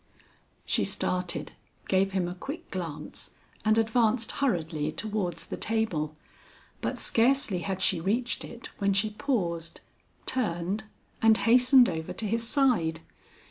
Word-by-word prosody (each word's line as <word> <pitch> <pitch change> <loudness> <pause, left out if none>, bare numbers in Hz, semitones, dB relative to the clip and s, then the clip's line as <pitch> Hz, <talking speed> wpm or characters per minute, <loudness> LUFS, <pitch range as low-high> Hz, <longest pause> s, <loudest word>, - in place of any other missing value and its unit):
She - - +2
started, 180 -1 -1 0.4
gave 190 0 +2
him 185 -2 +1
a 175 - -4
quick 275 - -7
glance, 170 -6 -6 0.3
and 215 0 +3
advanced 225 +1 +2
hurriedly 160 - -1
towards 205 -1 -3
the - - -6
table; 175 -9 0 0.7
but - - -2
scarcely 235 -5 +2
had 190 +1 -3
she 175 -3 +3
reached 235 +7 0
it 235 +1 -8
when 200 -1 +2
she 210 +2 +2
paused, 175 - -2 0.4
turned 205 -3 -1 0.4
and 225 -1 +6
hastened 250 +2 +6
over 160 0 -3
to 225 - -2
his 230 +2 -1
side. 225 - +2
205 Hz, 130 wpm, -28 LUFS, 175-230 Hz, 0.7 s, and